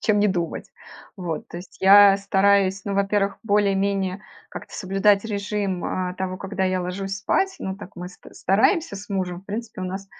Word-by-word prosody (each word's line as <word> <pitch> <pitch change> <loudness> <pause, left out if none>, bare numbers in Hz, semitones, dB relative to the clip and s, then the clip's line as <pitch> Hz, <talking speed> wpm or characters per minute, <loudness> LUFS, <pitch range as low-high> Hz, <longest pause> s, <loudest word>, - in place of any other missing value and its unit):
чем 210 -2 +2
не 210 - +3
думать. 175 -3 -3 0.5
Вот. 170 -4 -5
То - - -9
есть 175 +1 -11
я 200 +1 +8
стараюсь, 195 -1 +2
ну, 200 -1 -3
во-первых, 200 0 0
более-менее 200 -2 0 0.3
как-то - - -10
соблюдать 195 +2 +2
режим, 200 -3 -2
э, 180 -1 -2
того, 185 0 -3
когда 195 0 -4
я 185 0 0
ложусь 195 +2 -4
спать. 380 - 0
Ну, 190 0 -4
так 195 -2 -12
мы 180 +1 -6
ст - - -18
стараемся 220 - +2
с 200 +2 -9
мужем. 185 -3 -3
В 190 - -26
принципе 220 0 -6
у - - -3
нас 190 +2 -5
195 Hz, 180 wpm, -23 LUFS, 185-205 Hz, 0.5 s, я